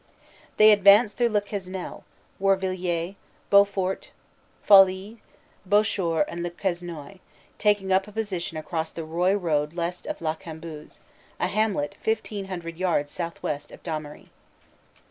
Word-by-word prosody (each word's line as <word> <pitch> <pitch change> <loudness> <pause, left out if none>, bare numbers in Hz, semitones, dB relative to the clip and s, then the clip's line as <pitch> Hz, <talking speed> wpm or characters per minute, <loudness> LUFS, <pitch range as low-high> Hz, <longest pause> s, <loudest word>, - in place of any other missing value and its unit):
They 215 0 +8
advanced 205 +2 +6
through 240 -1 +3
Le 210 -2 +2
Quesnel, 190 -2 -6 0.4
Warvillers, 185 -2 0 0.4
Beaufort, 200 -2 +3 0.6
Folies, 195 +2 +5 0.4
Bouchoir 200 -4 +2
and 170 - -6
Le 175 - -2
Quesnoy, 175 -1 -5 0.4
taking 205 -2 +2
up 190 +1 +2
a - - -11
posi 205 -4 -3
tion 165 -1 -5
across 160 0 -3
the 165 0 -7
Roye 175 +5 +1
road 155 -5 0
west 175 +1 -4
of - - -4
La 155 -1 -1
Cambuse, 160 -1 -10 0.4
a - - +1
hamlet 195 -6 -1
fifteen 215 -2 -2
hundred 170 -3 -6
yards 170 -6 0
southwest 165 -4 -4
of - - -14
Damery. 155 -3 -6
185 Hz, 130 wpm, -25 LUFS, 165-200 Hz, 0.6 s, They